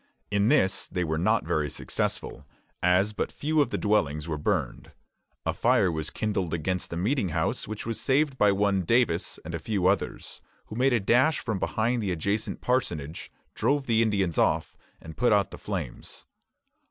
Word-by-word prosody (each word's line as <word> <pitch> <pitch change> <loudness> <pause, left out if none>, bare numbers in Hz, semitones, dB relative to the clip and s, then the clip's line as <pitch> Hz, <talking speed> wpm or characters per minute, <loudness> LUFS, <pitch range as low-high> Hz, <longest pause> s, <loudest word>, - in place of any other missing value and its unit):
In 100 0 +2
this 95 -3 +3
they 90 -1 -2
were 80 -1 -1
not 110 +2 +2
very 80 -3 0
successful, - - -4 0.3
as 90 +4 +3
but - - -2
few 155 +1 +1
of 140 - +1
the - - -2
dwellings 80 -8 0
were 75 -2 -3
burned. - - -2 0.5
A - - 0
fire 90 - +3
was 80 -1 -2
kindled 95 -6 -2
against 90 +3 -2
the 85 - -4
meeting 105 +2 0
house, 80 0 -1
which 110 0 -6
was 115 -1 -3
saved 140 +1 +2
by 105 -5 +4
one 100 -1 +2
Davis 100 -3 +1
and 85 - -6
a 85 - -2
few 100 +1 -1
others, 95 +2 -1 0.2
who 110 - -9
made 130 +3 +3
a 120 - +3
dash 125 +9 +3
from 110 -5 -3
behind 115 +5 0
the 100 -3 -1
adjacent 100 +6 -2
parsonage, 85 - -2 0.2
drove 145 -1 +1
the 115 -2 +3
Indians 100 -7 +1
off, - - +1 0.2
and 80 -1 -11
put 125 - +3
out 100 -2 +3
the - - -9
flames. 90 -12 -6
100 Hz, 180 wpm, -27 LUFS, 85-115 Hz, 0.5 s, by